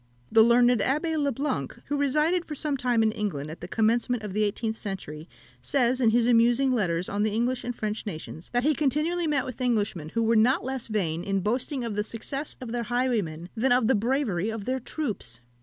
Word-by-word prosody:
The 225 0 +7
learned 240 +2 +6
Abbé 305 +9 0
le 285 -1 +1
Blanc, 245 - -3
who 290 - -2
resided 300 +5 +2
for 305 - -7
some 290 0 -1
time 245 -3 +1
in 220 - +3
England 155 -9 -3
at 160 - -10
the 175 - -6
commencement 230 +3 +1
of 205 -3 -5
the 215 +1 +1
eighteenth 220 +2 -1
century, 185 -7 -6 0.3
says, 255 -1 +1
in 230 - +5
his 235 +1 +3
amusing 240 +3 +4
letters 185 -7 0
on 205 +1 -2
the 215 - +2
English 240 +4 -1
and 245 0 -4
French 215 0 -4
nations, 160 -2 -7
that 245 0 +1
he 305 +2 +3
continually 310 +5 0
met 290 -4 +1
with 255 0 -7
Englishmen 210 -10 0
who 230 +6 0
were 230 +1 +3
not 235 +5 +4
less 265 -1 -4
vain 175 -7 -1
in 195 0 0
boasting 250 - -1
of 230 -3 -3
the 210 - 0
success 270 +7 -4
of 250 -3 -7
their 240 0 -1
highwaymen 215 -10 -1
than 245 +3 +1
of 245 -2 +4
the 265 - +4
bravery 225 -4 0
of 220 -2 -5
their 260 +1 -1
troops. 215 - -4
235 Hz, 215 wpm, -27 LUFS, 210-260 Hz, 0.3 s, The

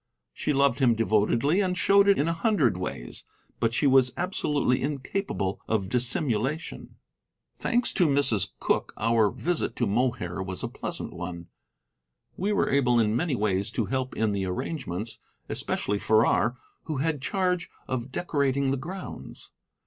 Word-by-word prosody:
She - - -1
loved 140 -2 +2
him 125 -4 +4
devotedly 115 - +2
and 180 -2 0
showed 200 +4 +5
it 200 - +5
in 145 - +1
a 165 - +1
hundred 165 - +2
ways, 90 -9 -5 0.4
but 115 - +1
she 130 - 0
was 130 -2 +5
absolutely 150 -8 0
incapable 135 - -2
of 105 -4 0
dissimulation. 125 +3 -1 0.6
Thanks 240 +1 +1
to 180 -5 +3
Mrs. 130 -9 +3
Cooke, - - 0
our 115 -2 +3
visit 175 - -1
to 120 - 0
Mohair 105 -5 -1
was 95 -1 -4
a - - 0
pleasant - - -5
one. 85 -1 -7 0.9
We 200 +4 -1
were 205 - +1
able 125 -3 +3
in 110 -1 +2
many 145 +2 0
ways 100 -2 0
to - - 0
help 130 -1 -2
in 110 -1 +1
the 100 -2 -1
arrangements, 110 - -4 0.3
especially 105 0 -1
Farrar, 110 +3 +3 0.3
who 155 -3 -3
had 150 0 -1
charge 180 +1 0 0.2
of 130 0 -3
decorating 140 -4 0
the 135 - 0
grounds. 180 +8 -8
130 Hz, 150 wpm, -27 LUFS, 110-155 Hz, 0.9 s, showed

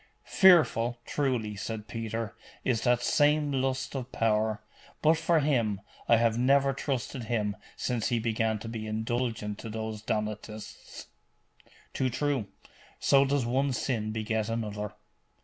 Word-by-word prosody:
'Fearful, 150 -11 +5
truly,' 125 -7 -1
said 105 +1 -5
Peter, 115 0 -4 0.3
'is 120 -4 +1
that 125 -1 +2
same 150 0 +3
lust 130 -1 -1
of 130 -1 -4
power: 110 -1 +1 0.4
but 160 +1 +6
for 165 0 +2
him, 115 -9 +1 0.3
I 115 - +7
have 115 0 +2
never 135 +2 +4
trusted 130 -2 -3
him 105 -3 -1 0.2
since 120 -3 -1
he 120 - +1
began 110 -1 0
to 115 - -6
be 110 -1 -5
indulgent 110 -1 -2
to 115 - -7
those 110 -1 -4
Donatists.' 110 0 -5 0.9
'Too 130 - 0
true. 135 -3 -1 0.5
So 140 0 +5
does 140 -2 +1
one 135 +3 +1
sin 110 -2 -1
beget 110 0 -1
another. 105 -2 -3
115 Hz, 135 wpm, -29 LUFS, 110-135 Hz, 0.9 s, I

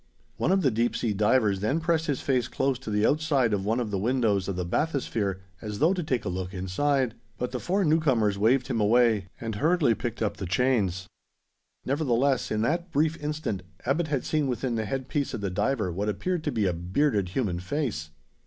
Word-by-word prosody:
One - - +1
of 190 -1 +3
the 135 - +3
deep 115 +2 0
sea 110 -3 0
divers 105 -1 +2
then 110 +11 0
pressed 165 -1 0
his 140 -3 -1
face 125 -4 +1
close 135 -2 0
to - - -7
the 105 0 +2
outside 145 -6 +2
of 100 -2 0
one 110 +4 0
of 115 -4 -2
the 100 - -1
windows 110 -4 +1
of 100 - -2
the 90 -1 -2
bathysphere, 105 - -1 0.2
as 105 -2 -5
though 160 - +4
to 185 - -2
take 130 -8 -1
a - - -2
look 90 +1 -4
inside; 125 +7 0 0.2
but 125 - -3
the 125 - -3
four 190 +6 0
newcomers 135 -10 +2
waved 120 +6 +3
him 115 - -1
away, 110 -2 +3
and 115 -1 -4
hurriedly 150 - +3
picked 115 0 -3
up 105 - -1
the 95 - -4
chains. 95 -4 +1 0.8
Nevertheless, 135 -2 +1
in 110 0 0
that 170 +7 0
brief 155 +1 +2
instant, 150 -10 -3 0.2
Abbot 155 +6 +1
had 140 -4 -1
seen 155 -3 +1
within 125 0 -1
the 110 -1 -1
head 130 +4 -3
piece 145 -1 -1
of - - -5
the 100 -2 -2
diver 105 0 0
what 100 +5 -2
appeared 175 - -2
to 150 - 0
be 110 -5 0
a 90 - +1
bearded 95 - 0
human 95 -4 -1
face. 95 - -3
120 Hz, 210 wpm, -27 LUFS, 105-145 Hz, 0.8 s, though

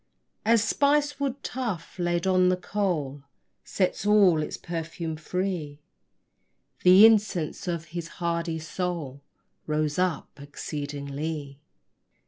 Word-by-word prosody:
As 225 0 +4
spice 290 +4 +2
wood 275 -1 -2
tough, 220 -9 -4
laid 175 0 0
on 185 -1 +4
the 180 - +2
coal, 175 -8 -2 0.4
Sets 185 -1 -1
all 200 -6 +5
its - - -4
perfume 165 -1 -5
free, 160 -3 -3 1.0
The 185 +4 +8
incense 205 -7 +2
of 170 -2 -2
his 170 -1 -4
hardy 170 -1 -1
soul 160 -3 -4 0.5
Rose 155 0 0
up 180 -5 -1
exceedingly. 145 0 -5
175 Hz, 110 wpm, -26 LUFS, 155-195 Hz, 1.0 s, The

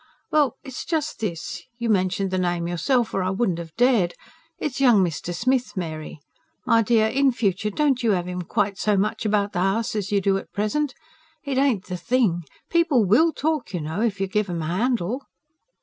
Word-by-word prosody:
"Well, 295 -5 +3
it's 265 -4 -6
just 310 -4 -2
this 175 -7 -4 0.2
you 235 -1 -2
mentioned 190 -2 +1
the 185 - 0
name 175 -1 0
yourself, 235 +8 0
or 195 - 0
I 185 - 0
wouldn't 190 -3 0
have 165 -1 -9
dared. 235 -8 +3 0.4
It's 275 -3 -3
young 235 -7 +6
Mr. 170 0 -3
Smith, 250 +5 0
Mary. 155 -3 -5 0.5
My 230 -2 +4
dear, 225 0 +3
in 270 +4 +3
future 210 -3 0
don't 270 +3 +1
you 225 -3 +3
have 180 -1 -1
'im 180 0 -3
quite 195 +3 -1
so 210 -2 +2
much 210 +2 0
about 205 -1 +1
the 180 - -1
house 195 +5 0
as 205 -2 -2
you 205 - +3
do 195 0 +1
at - - -13
present. 260 +8 -1 0.5
It 275 -3 -1
ain't 260 -9 +2
the 180 -1 -4
thing. 175 -4 +1 0.2
People 330 -10 +3
WILL 310 - +4
talk, 305 - -2
you - - -1
know, 160 +7 -3
if 215 -4 0
you 195 - +1
give 205 +1 -1
'em 170 -2 -3
a 165 +3 -2
handle." 240 +1 0
210 Hz, 200 wpm, -24 LUFS, 180-250 Hz, 0.5 s, young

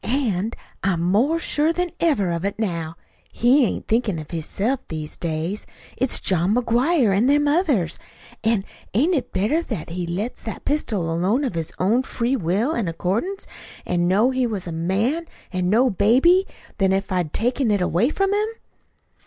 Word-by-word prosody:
An' 225 -5 0 0.3
I'm 190 -3 +1
more 225 - +2
sure 315 -1 +1
than 355 0 -1
ever 220 - +2
of 170 0 -2
it 200 0 -2
now. 170 -7 -3 0.4
He 255 +4 +4
ain't - - -5
thinkin' 220 -5 +1
of 155 -1 -8
hisself 200 - -1
these 155 -1 -6
days. 170 +4 -3 0.3
It's 260 0 +1
John 185 +3 +1
McGuire 245 - +2
and 230 +7 +3
them 290 +1 +3
others. 285 - +1 0.4
An' 220 -3 +1 0.3
ain't 305 - +3
it 255 -6 -1
better 225 - +1
that 220 - -5
he 175 0 -3
let 200 +8 -3
that 220 - -7
pistol 210 - 0
alone 195 - +1
of 255 - -1
his 165 -2 -3
own 215 +7 +2
free 255 0 -1
will 210 - 0
an' 230 - -1
accordance, 205 - -2 0.4
an' 175 0 +1
know 210 +8 +3
he 255 -1 +1
was 205 -5 -3
a 170 - -5
man 205 - 0 0.3
an' 180 -1 0
no 240 +5 +4
baby, 265 - +4 0.3
than 190 -1 +3
if 195 0 -1
I'd 180 -5 0
taken 245 +2 0
it 205 -1 +2
away 180 +6 +2
from 390 +5 0
him?" 420 +1 +1
220 Hz, 175 wpm, -22 LUFS, 180-270 Hz, 0.4 s, He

